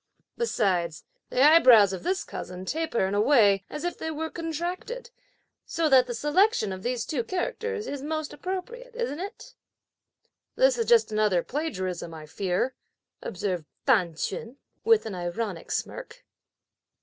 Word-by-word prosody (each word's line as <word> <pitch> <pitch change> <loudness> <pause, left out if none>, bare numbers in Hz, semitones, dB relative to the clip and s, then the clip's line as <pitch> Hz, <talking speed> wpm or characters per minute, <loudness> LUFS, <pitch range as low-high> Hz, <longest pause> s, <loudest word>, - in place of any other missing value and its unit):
Besides 185 - 0 0.3
the 255 - +2
eyebrows 255 - +7
of 185 - -5
this 375 +1 -1
cousin 180 +1 -7
taper 315 -6 0
in 190 - -2
a 205 - +3
way, 210 -6 +5
as 300 - -6
if 350 - -3
they 320 - -3
were 320 +1 -4
contracted, 350 +9 -4 0.5
so 330 -2 0
that 260 -2 +6
the 240 - -3
selection 295 - +2
of 185 - -7
these 240 +1 -2
two 260 -6 -2
characters 430 - -3
is 285 -1 -5
most 310 +1 -3
appropriate, 465 +7 -6
isn't 470 -11 -3
it?" 395 +3 -8 1.0
"This - - +4
is 460 - 0
just 470 - +5
another 210 -5 +2
plagiarism, 185 - -3
I 155 -1 -9
fear," 185 +9 -1 0.5
observed 180 -3 -3 0.2
T'an 190 - +3
Ch'un, 230 - -4 0.3
with 450 -1 +4
an 220 - -4
ironic 180 +1 -4
smirk. - - -5
270 Hz, 150 wpm, -27 LUFS, -, 1.0 s, eyebrows